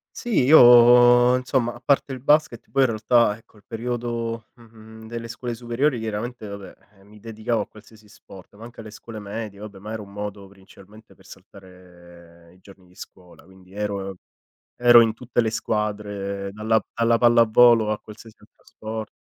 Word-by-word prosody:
Sì, 235 - -1
io 120 -2 +7
insomma, 125 -2 -1
a - - -13
parte 140 +2 +1
il 130 - -6
basket 145 -3 0
poi 135 - +1
in 130 - +4
realtà, 110 -1 +1
ecco, 110 -1 -25
il 105 - -22
periodo 115 -1 -5
mhmm, 120 -2 -19
mhmm, 110 0 -14
delle 115 0 -7
scuole 120 +1 -6
superiori 120 +3 -2
chiaramente 110 +1 -6
vabbè, 100 -1 -10 0.3
eh, - - -21
mi 105 +1 -18
dedicavo 110 +1 -3
a - - -7
qualsiasi 110 0 -19
sport, 95 -2 -16
ma 110 - -14
anche 120 0 -13
alle 110 -1 -10
scuole 110 +1 -11
medie, 105 0 -8
vabbè 105 -1 -10
ma 105 +3 -10
era 110 -1 -6
un 100 -1 -13
modo 100 -1 -7
principalmente 100 +2 -19
per 95 - -24
saltare 85 -3 -17
i - - -24
giorni 95 -1 -19
di 90 - -24
scuola, 90 -2 -15
quindi 95 +1 -20
ero 100 -2 -5 0.6
ero 120 -1 +6
in 115 -1 +1
tutte 125 +1 -5
le 115 -2 +1
squadre 105 -3 -4
dalla 110 +1 -1
dalla 115 0 +1
pallavolo 115 -1 +4
a 105 - -3
qualsiasi 110 +1 -15
altro - - -25
sport. 110 0 -8
110 Hz, 180 wpm, -22 LUFS, 100-120 Hz, 0.6 s, io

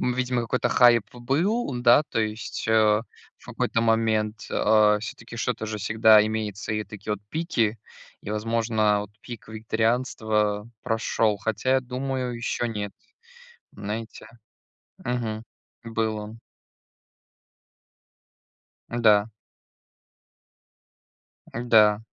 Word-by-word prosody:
Ну, 125 - 0
видимо, 125 -1 0
какой-то 125 +2 0
хайп 120 -3 +5
был, 160 - 0
да, 120 +4 +6
то - - -1
есть, 110 +1 -4
э, 110 - +1 0.7
в - - -22
какой-то 115 - -1
момент. 110 -2 +1
А, 105 -1 +4
всё-таки 115 +2 -8
что-то 110 -1 -2
же 110 -1 -4
всегда 110 +1 +5
имеется, 110 -1 -3
и 105 0 -1
такие 105 0 -6
вот 100 - -4
пики, 115 - 0 0.4
и, 105 - -7
возможно, 110 -1 +1
вот 105 - -10
пик 120 -2 -10
вегетарианства 110 -1 -1
прошел. 110 -2 0
Хотя, 110 +5 -1
я 130 - +3
думаю, 130 0 -3
еще 120 0 -2
нет, 105 -3 -4 0.8
знаете. 110 +2 -6 0.8
Мгм. 115 -3 -3 0.4
Был 110 -1 -2
он. 105 +2 -8 2.5
Да. 110 -3 +4 2.3
Н-да. 110 -3 +4
110 Hz, 105 wpm, -25 LUFS, 105-120 Hz, 2.5 s, да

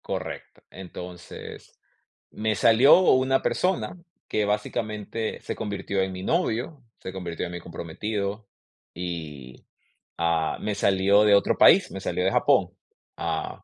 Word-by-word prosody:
Correcto. - - -6
Entonces, 90 -1 -10 0.5
me 110 0 -1
salió 115 - +6
una 130 +1 +3
persona 185 -1 -1 0.3
que, 105 - 0
básicamente, 105 +1 -3
se - - -5
convirtió 100 -2 -3
en 95 0 -1
mi 95 0 -7
novio, 125 +8 -1 0.2
se 95 - -7
convirtió 90 -2 -4
en 90 - -6
mi 90 - -5
comprometido 100 +5 -5 0.5
y, 80 -7 -7 0.5
ah, 85 -1 0
me 105 - -2
salió 100 +1 +3
de 105 -1 +6
otro 100 - +2
país, - - +6
me - - -6
salió - - -2
de - - +2
Japón, - - +3 0.5
ah 80 -1 -4
100 Hz, 130 wpm, -25 LUFS, 90-110 Hz, 0.5 s, salió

